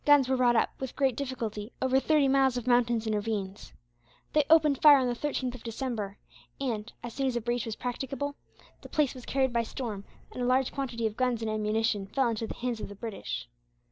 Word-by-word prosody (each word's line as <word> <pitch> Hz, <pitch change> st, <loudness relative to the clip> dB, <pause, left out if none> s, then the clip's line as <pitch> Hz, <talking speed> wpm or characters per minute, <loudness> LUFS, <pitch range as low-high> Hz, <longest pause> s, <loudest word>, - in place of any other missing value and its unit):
Guns 290 Hz, -3 st, +6 dB
were 265 Hz, 0 st, +1 dB
brought 245 Hz, -1 st, +4 dB
up, 225 Hz, -, +2 dB
with 265 Hz, -2 st, -5 dB
great 270 Hz, -4 st, +2 dB
difficulty, 230 Hz, -5 st, -4 dB
over 260 Hz, 0 st, +3 dB
thirty 300 Hz, 0 st, +3 dB
miles 265 Hz, -2 st, +3 dB
of 245 Hz, -, -4 dB
mountains 240 Hz, -2 st, +2 dB
and 220 Hz, -, 0 dB
ravines. 205 Hz, -2 st, -3 dB, 0.6 s
They 300 Hz, -, +4 dB
opened 305 Hz, -4 st, +5 dB
fire 295 Hz, -2 st, +9 dB
on 260 Hz, -, +1 dB
the 245 Hz, -, 0 dB
13th 255 Hz, -1 st, -2 dB
of 250 Hz, -, -10 dB
December 225 Hz, -4 st, -4 dB, 0.4 s
and, 235 Hz, -5 st, -3 dB
as 240 Hz, -1 st, -6 dB
soon 270 Hz, -1 st, 0 dB
as 255 Hz, -, -1 dB
a 240 Hz, -, 0 dB
breach 240 Hz, 0 st, -1 dB
was 220 Hz, -, -3 dB
practicable, 275 Hz, +3 st, -4 dB, 0.5 s
the -, -, -11 dB
place 300 Hz, -4 st, +1 dB
was 255 Hz, -2 st, -11 dB
carried 265 Hz, -2 st, +1 dB
by 235 Hz, -, +3 dB
storm, 220 Hz, -3 st, -5 dB, 0.3 s
and 250 Hz, -, -6 dB
a -, -, +1 dB
large 255 Hz, +1 st, +2 dB
quantity 240 Hz, -5 st, -3 dB
of 215 Hz, -1 st, -2 dB
guns 250 Hz, -3 st, 0 dB
and 220 Hz, -, -1 dB
ammunition 215 Hz, -1 st, 0 dB
fell 260 Hz, +4 st, +1 dB
into 225 Hz, 0 st, -2 dB
the -, -, -6 dB
hands 245 Hz, -2 st, -3 dB
of -, -, -5 dB
the 205 Hz, -, -9 dB
British. 200 Hz, -, -5 dB
245 Hz, 220 wpm, -29 LUFS, 225-265 Hz, 0.6 s, fire